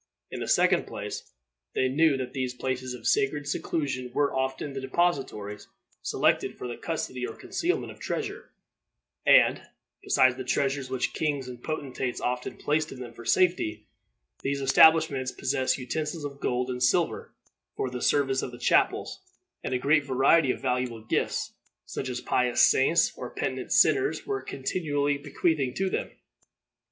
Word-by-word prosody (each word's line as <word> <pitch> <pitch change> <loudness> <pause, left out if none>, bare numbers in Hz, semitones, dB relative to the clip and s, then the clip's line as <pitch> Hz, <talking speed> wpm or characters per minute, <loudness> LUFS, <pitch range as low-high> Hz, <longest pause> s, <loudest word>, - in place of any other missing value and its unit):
In - - -5
the - - -4
second - - +3
place, - - -6 0.4
they 130 - +2
knew 145 +2 +3
that 130 -1 -5
these 130 -2 -2
places 130 0 -3
of 125 - -12
sacred 140 +4 +1
seclusion 135 -5 -2
were 145 -1 +2
often 130 +2 -2
the 135 - -4
depositories 130 -9 -1 0.3
selected - - +1
for - - -5
the 120 - -5
custody 130 -6 -4
or 115 - -8
concealment 360 +2 -2
of - - -14
treasure; - - -4 0.8
and, - - +6 0.4
besides 130 - +3
the 130 - -4
treasures 135 +1 0
which 130 -1 -1
kings 145 -4 -1
and 125 -1 -9
potentates 135 -5 -3
often 125 0 -3
placed 155 +1 0
in 130 - -9
them 120 -2 -8
for 115 0 -12
safety, 110 -14 +1 0.6
these 140 0 -1
establishments 140 -1 +5
possessed 130 0 0
utensils 150 +5 -3
of 140 -1 -7
gold 125 0 -1
and 125 0 -5
silver 125 - +1 0.4
for 130 - -2
the 125 -1 -5
service 135 -2 +2
of - - -5
the 120 - -10
chapels, 120 - +1 0.4
and - - -3
a 130 - +1
great 145 +3 +3
variety 135 +3 +3
of - - 0
valuable 125 -3 -2
gifts, - - -1 0.3
such 130 - -5
as 125 -1 -4
pious 125 -1 +1
saints 145 +6 +4
or - - -6
penitent - - -4
sinners 400 +1 +3
were 405 -1 -2
continually 145 -1 -1
bequeathing 140 -2 0
to 190 -1 -1
them. - - -2
135 Hz, 160 wpm, -27 LUFS, 125-145 Hz, 0.8 s, and